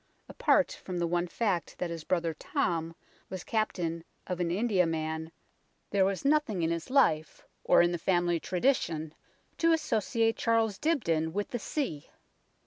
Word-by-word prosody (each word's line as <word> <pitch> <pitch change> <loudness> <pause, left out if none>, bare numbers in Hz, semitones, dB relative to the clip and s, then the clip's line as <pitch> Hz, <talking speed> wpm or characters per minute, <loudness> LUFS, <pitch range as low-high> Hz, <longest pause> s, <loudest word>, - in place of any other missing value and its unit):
Apart - - +2
from 180 -2 -4
the 170 - +1
one 175 +1 0
fact 185 -2 -1
that 175 -1 -3
his 165 -2 -5
brother 170 -2 0
Tom 165 +1 -2 0.3
was 185 -2 -6
captain 175 -7 -1 0.2
of 180 -1 -4
an 175 -1 0
Indiaman, 165 -6 0 0.6
there 195 -2 +3
was 195 +5 -2
nothing 280 - +2
in 165 - +1
his 170 -1 -3
life 160 - +2 0.2
or - - +5
in 175 - +2
the 175 - -2
family 175 -1 +1
tradition 170 - 0 0.5
to 330 0 +4
associate 225 -6 +1
Charles 225 -3 +1
Dibdin 165 - 0
with 205 +1 -2
the 240 - -3
sea. 220 - -3
180 Hz, 150 wpm, -30 LUFS, 165-225 Hz, 0.6 s, or